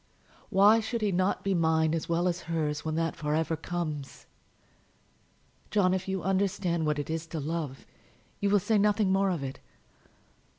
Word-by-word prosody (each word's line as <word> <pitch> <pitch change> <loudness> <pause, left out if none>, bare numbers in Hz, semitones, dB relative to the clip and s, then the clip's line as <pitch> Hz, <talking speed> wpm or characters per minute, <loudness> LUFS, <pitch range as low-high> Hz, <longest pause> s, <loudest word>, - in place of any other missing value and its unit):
Why 210 +2 +6
should 225 +1 -3
he 210 -2 +1
not 185 +2 0
be 195 - +1
mine 160 -2 +2
as 165 0 -3
well 170 +2 +1
as 175 0 -1
hers 150 -3 -1
when 155 0 -2
that 165 0 -1
for 150 0 -1
ever 160 +1 0
comes? 155 -4 -5 1.4
John, 185 -3 +3
if 190 0 -2
you 190 -2 -2
understand 185 -4 0
what 150 -1 +1
it 145 +2 -3
is 165 0 -3
to 160 0 -5
love, 150 -3 -4 0.5
you 200 - +1
will 205 - +5
say 215 +3 +1
nothing 210 -1 +2
more 195 0 +3
of 170 -6 -2
it. 135 0 -6
170 Hz, 175 wpm, -29 LUFS, 160-195 Hz, 1.4 s, Why